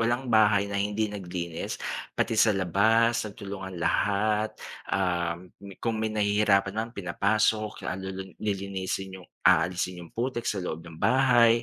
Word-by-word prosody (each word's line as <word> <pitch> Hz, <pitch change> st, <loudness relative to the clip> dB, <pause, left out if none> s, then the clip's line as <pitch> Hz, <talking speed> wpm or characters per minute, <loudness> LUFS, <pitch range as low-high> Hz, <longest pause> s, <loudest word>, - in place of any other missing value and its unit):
walang 120 Hz, +1 st, 0 dB
bahay 105 Hz, -2 st, +5 dB
na 100 Hz, 0 st, -2 dB
hindi 105 Hz, +1 st, 0 dB
naglinis. 90 Hz, -4 st, -4 dB, 0.4 s
Pati 115 Hz, -, +1 dB
sa 110 Hz, 0 st, +5 dB
labas, 110 Hz, +6 st, +3 dB
sa -, -, -6 dB
tulungan 95 Hz, -3 st, -7 dB
lahat. 105 Hz, +4 st, +1 dB, 0.3 s
Um, 85 Hz, -1 st, -1 dB, 0.3 s
kung 115 Hz, -2 st, -1 dB
may 110 Hz, -, 0 dB
nahihirapan 105 Hz, -2 st, +2 dB
naman 115 Hz, +2 st, -4 dB
pinapasok. 105 Hz, +3 st, 0 dB
Ah, -, -, -1 dB, 0.5 s
lilinisin 95 Hz, -1 st, -3 dB
yung -, -, -19 dB, 0.2 s
aalisin 90 Hz, 0 st, +2 dB
yung 85 Hz, -, -12 dB
putik 120 Hz, 0 st, -2 dB
sa 100 Hz, -, -1 dB
loob 80 Hz, -1 st, -4 dB
ng 80 Hz, -2 st, -12 dB
bahay, 120 Hz, -3 st, +4 dB
100 Hz, 140 wpm, -27 LUFS, 95-110 Hz, 0.5 s, bahay